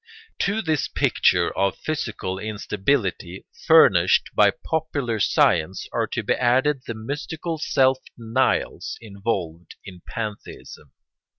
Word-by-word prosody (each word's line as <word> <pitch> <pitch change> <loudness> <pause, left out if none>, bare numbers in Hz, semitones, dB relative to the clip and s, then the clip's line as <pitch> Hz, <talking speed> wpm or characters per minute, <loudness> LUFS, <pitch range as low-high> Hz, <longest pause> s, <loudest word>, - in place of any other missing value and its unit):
] 450 - -32
To 210 +3 -1
this 155 -4 0
picture - - +1
of 100 0 0
physical 115 -11 -4
instability 100 -3 -2 0.2
furnished 95 - +5
by - - +5
popular 145 -8 -3
science 90 -2 +2
are - - 0
to - - -3
be - - +1
added 130 +3 +2
the 115 - -4
mystical 155 +7 -5
self 130 -3 +2 0.2
denials 120 +3 -1
involved 100 -6 -5
in 90 -3 -11
pantheism. 110 -4 -7
115 Hz, 115 wpm, -23 LUFS, 100-145 Hz, 0.2 s, furnished